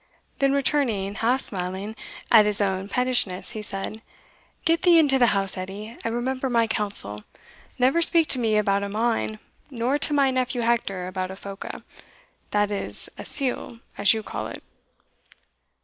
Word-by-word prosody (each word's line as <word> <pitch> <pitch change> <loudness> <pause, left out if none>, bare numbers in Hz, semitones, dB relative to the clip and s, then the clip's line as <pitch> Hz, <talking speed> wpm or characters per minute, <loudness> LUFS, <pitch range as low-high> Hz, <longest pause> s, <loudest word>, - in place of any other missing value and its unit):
Then 275 0 +3
returning, 260 -8 +1
half 240 +5 +1
smiling 190 +3 -2 0.4
at 215 -2 +7
his 210 -1 +4
own 195 -1 -1
pettishness, 245 -6 0
he 220 - -5
said, 210 +1 -6 0.6
"Get 330 0 +3
thee 350 -2 +6
into 280 -4 +4
the 240 - +5
house, 195 -3 0
Edie, 200 +5 -7
and 230 0 -2
remember 260 +2 -2
my 230 -2 +3
counsel, 200 - -1 0.5
never 260 +7 +3
speak 335 -1 +3
to 260 - +2
me 220 -3 +2
about 200 -1 +2
a 200 - -3
mine, 220 0 -1 0.3
nor 260 +2 0
to 290 - +2
my 280 -2 +3
nephew 255 -1 -1
Hector 230 -6 0
about 185 0 -3
a 190 - -7
phoca, 195 0 -8 0.7
that 205 0 +1
is 200 - -4
a - - -5
sealgh, 250 -3 -2 0.2
as 200 - +4
you 220 -1 0
call - - -5
it." - - -9
225 Hz, 165 wpm, -24 LUFS, 200-255 Hz, 0.7 s, at